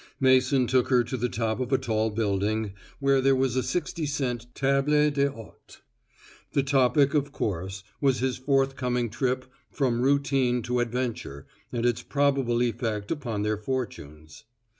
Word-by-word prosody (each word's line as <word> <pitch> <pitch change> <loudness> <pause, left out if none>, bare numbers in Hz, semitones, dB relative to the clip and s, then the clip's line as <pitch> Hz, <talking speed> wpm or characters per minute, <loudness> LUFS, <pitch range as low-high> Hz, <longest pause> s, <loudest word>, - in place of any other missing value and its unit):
Mason 130 0 +4
took 125 0 +2
her 125 -2 +4
to 125 - -4
the 125 0 -1
top 110 0 -2
of 130 0 -3
a 135 - +4
tall 110 -2 0
building, 105 0 -1 0.3
where 140 -1 +3
there 135 0 +4
was 130 -2 +1
a 130 - +2
sixty 165 +1 -2
cent 125 -5 -2
table 145 +2 +2
d'hote. 140 -6 -4 0.7
The 140 - +2
topic, 135 +1 +3
of 145 -2 0
course, 95 - -3 0.2
was 135 -3 +3
his 130 0 -1
forthcoming 130 -3 0
trip 130 +2 -1 0.2
from 125 -4 0
routine 135 -3 +2
to 125 +2 -1
adventure 120 - -3 0.3
and 120 -1 -2
its 120 -2 +1
probable 135 -4 +1
effect 115 -3 -2
upon 120 -9 -2
their 105 0 0
fortunes. 100 - -6
125 Hz, 150 wpm, -26 LUFS, 115-135 Hz, 0.7 s, Mason